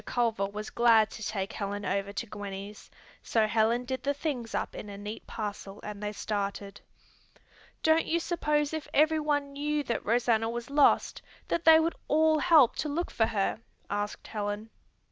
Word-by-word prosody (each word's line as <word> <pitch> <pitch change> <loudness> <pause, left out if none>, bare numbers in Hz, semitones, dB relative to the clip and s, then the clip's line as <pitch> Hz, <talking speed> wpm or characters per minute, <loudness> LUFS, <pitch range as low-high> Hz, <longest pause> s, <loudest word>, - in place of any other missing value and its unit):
Culver 225 -5 0
was 210 +2 -7
glad 225 -2 +4
to - - -9
take 200 -1 -3
Helen 205 0 -4
over 200 +1 -1
to 200 +3 -4
Gwenny's, 205 -1 -8 0.3
so 225 -2 +2
Helen 225 +3 +1
did 260 0 -3
the 285 +2 -1
things 270 -6 -3
up - - -2
in 210 - -8
a 200 - -8
neat 210 +2 -7
parcel 205 -2 -6
and 210 -1 -7
they 210 0 -2
started. 200 -1 -4 1.0
"Don't 320 +1 +3
you 335 - +1
suppose 300 -3 0
if 315 -1 -4
everyone 295 -2 +2
knew 295 +1 -1
that 240 - -2
Rosanna 225 -1 +2
was 240 +2 -5
lost 285 0 +3 0.3
that 340 - -1
they 320 0 +9
would 330 +1 +1
all 315 +1 +3
help 300 -7 +5
to 305 - -2
look 335 +5 -2
for 225 - +2
her?" 200 0 -1 0.3
asked 205 +1 -3
Helen. 210 +1 -4
230 Hz, 170 wpm, -29 LUFS, 205-295 Hz, 1.0 s, they